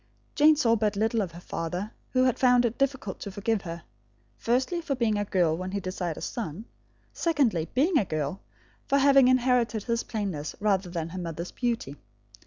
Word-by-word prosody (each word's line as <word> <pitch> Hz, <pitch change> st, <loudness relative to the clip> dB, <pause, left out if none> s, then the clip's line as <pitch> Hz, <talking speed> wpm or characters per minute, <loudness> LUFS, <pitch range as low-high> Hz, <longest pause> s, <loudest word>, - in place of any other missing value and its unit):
Jane 305 Hz, +1 st, +6 dB
saw 235 Hz, -6 st, +3 dB
but 210 Hz, -2 st, 0 dB
little 220 Hz, +2 st, +1 dB
of 185 Hz, -4 st, -3 dB
her 170 Hz, -, -9 dB
father, 175 Hz, +4 st, -4 dB, 0.2 s
who 255 Hz, 0 st, +2 dB
had 255 Hz, -2 st, +1 dB
found 250 Hz, -1 st, +5 dB
it 235 Hz, 0 st, -2 dB
difficult 265 Hz, -7 st, -1 dB
to -, -, -6 dB
forgive 205 Hz, +2 st, -1 dB
her, 170 Hz, -2 st, -7 dB, 0.5 s
firstly, 260 Hz, +9 st, 0 dB
for 295 Hz, -4 st, -2 dB
being 230 Hz, -4 st, +1 dB
a 205 Hz, 0 st, -1 dB
girl 175 Hz, -5 st, +2 dB
when 185 Hz, +2 st, -5 dB
he 200 Hz, -, 0 dB
desired 180 Hz, -3 st, -4 dB
a -, -, -7 dB
son; 210 Hz, -2 st, -5 dB, 0.5 s
secondly, 250 Hz, -, +1 dB
being 300 Hz, +5 st, +3 dB
a 205 Hz, -, 0 dB
girl, 155 Hz, +2 st, -3 dB, 0.5 s
for 280 Hz, -, +3 dB
having 275 Hz, -2 st, +6 dB
inherited 245 Hz, -4 st, +2 dB
his 235 Hz, 0 st, 0 dB
plainness 190 Hz, -9 st, -4 dB
rather 200 Hz, -3 st, +1 dB
than 165 Hz, -2 st, -4 dB
her 185 Hz, +2 st, -6 dB
mother's 170 Hz, 0 st, -5 dB
beauty. 230 Hz, -, -2 dB
215 Hz, 190 wpm, -27 LUFS, 180-250 Hz, 0.5 s, Jane